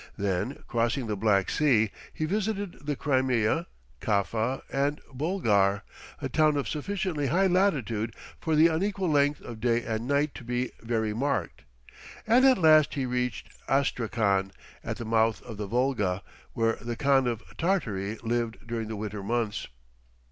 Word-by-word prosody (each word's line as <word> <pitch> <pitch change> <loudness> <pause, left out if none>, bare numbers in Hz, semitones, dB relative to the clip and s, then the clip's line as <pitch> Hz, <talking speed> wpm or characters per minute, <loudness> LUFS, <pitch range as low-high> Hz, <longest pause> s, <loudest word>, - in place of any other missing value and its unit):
Then, 100 +7 -1
crossing 120 +1 0
the 105 -2 -2
Black 100 -2 +2
Sea, 115 -8 +3 0.2
he 155 - -2
visited 200 -3 -2
the 145 - 0
Crimea, 130 +2 +1 0.3
Kaffa, 110 +5 0
and 140 +2 +1
Bulgar, 110 - +1 0.4
a - - -2
town 155 -2 +3
of 140 - -1
sufficiently 165 -2 -2
high 180 +9 +3
latitude 135 - +1 0.2
for 160 -1 0
the 155 +2 +6
unequal 185 +2 +1
length 145 0 +2
of 115 -2 -8
day 120 -1 +2
and 115 +1 -3
night 145 +1 +1
to - - -9
be 125 +1 -2
very 110 -2 -1
marked; 135 - -2 0.6
and 235 +4 +5
at 260 -2 +5
last 155 -3 +5
he 135 -2 -1
reached 125 -1 -2 0.2
Astrakhan, 115 -7 +1 0.3
at - - -4
the 115 - -6
mouth 110 0 +2
of 115 -4 -8
the 105 -1 -4
Volga, 105 -6 0 0.3
where 115 0 +1
the 120 +1 -4
Khan 135 -1 +3
of 115 -2 -2
Tartary 115 - -1
lived 115 0 -2
during 115 -2 -3
the 110 - -4
winter 105 -1 -5
months. 115 +1 -2
125 Hz, 155 wpm, -28 LUFS, 110-150 Hz, 0.6 s, the